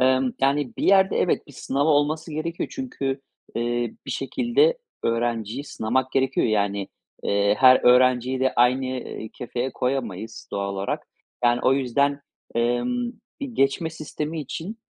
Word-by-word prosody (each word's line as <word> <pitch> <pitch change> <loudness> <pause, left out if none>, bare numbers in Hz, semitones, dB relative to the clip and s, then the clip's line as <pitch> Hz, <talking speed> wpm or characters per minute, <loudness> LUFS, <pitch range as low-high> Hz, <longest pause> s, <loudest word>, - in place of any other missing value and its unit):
Emm, 130 0 +3
yani, 140 -1 +1
bir - - -4
yerde 190 0 +5
evet, 180 - +1
bir 145 - -14
sınav 140 +2 -1
olması 155 +2 +1
gerekiyor. 165 +2 -3
Çünkü, 140 - -3 0.3
eee, 120 0 -1
bir - - -4
şekilde 240 - +2 0.3
öğrenciyi 115 +2 -1
sınamak 130 0 -1
gerekiyor. 135 0 +2
Yani, 100 -2 0 0.3
eee, 100 +1 +2
her 130 -1 +7
öğrenciyi 125 +1 +4
de 130 - +2
aynı, 125 +2 +4
eee, 125 -3 -5
kefeye 125 +1 -3
koyamayız 115 -5 -3
doğal 100 -1 -2
olarak. 95 0 -3 0.4
Yani 120 0 +4
o 130 - +4
yüzden, 140 +2 +1 0.3
emm, 180 - 0 0.3
bir 280 - -2
geçme 140 -1 +1
sistemi 155 0 -5
için 170 - -6
130 Hz, 140 wpm, -24 LUFS, 120-150 Hz, 0.4 s, her